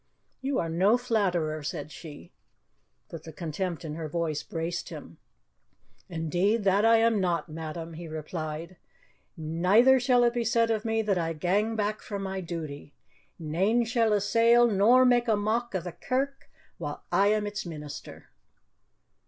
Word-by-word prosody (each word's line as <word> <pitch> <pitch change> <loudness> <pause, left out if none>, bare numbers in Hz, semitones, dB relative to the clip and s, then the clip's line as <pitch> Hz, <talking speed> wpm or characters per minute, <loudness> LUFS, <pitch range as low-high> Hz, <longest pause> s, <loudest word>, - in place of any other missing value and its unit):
"You 270 0 -1
are 165 - 0
no 190 +8 +3
flatterer," 185 -11 0
said 150 +1 -5
she. 145 - -11 0.8
But 165 - -8
the 160 - -10
contempt 170 +1 -4
in 150 - -5
her 155 0 -5
voice 160 -2 -2
braced 165 +1 -4
him. - - -10 0.9
"Indeed, 180 +6 0
that 195 +1 +3
I 225 0 +6
am 225 -1 +3
not, 175 -3 -1
madam," 160 +1 -6
he 165 +1 -8
replied; 155 +2 -6 0.6
"neither 185 +12 +4
shall 245 -1 +3
it 240 0 +3
be 240 -1 -1
said 230 0 +2
of 220 -1 -1
me 225 0 0
that 200 -4 +1
I 165 -1 -1
gang 200 +8 0
back 215 0 -1
from 200 -2 -5
my 190 0 -3
duty. 155 -4 -7 0.4
Nane 190 +9 +1
shall 230 -1 +1
assail 230 +4 +4
nor 235 +4 +5
make 245 -1 +3
a 220 - +3
mock 220 +2 -1
of 180 - -1
the 175 - -5
Kirk 270 +7 -3 0.3
while - - -6
I 200 - +4
am 210 0 +2
its 205 +1 -4
minister." 150 -4 -9
195 Hz, 160 wpm, -28 LUFS, 165-225 Hz, 0.9 s, I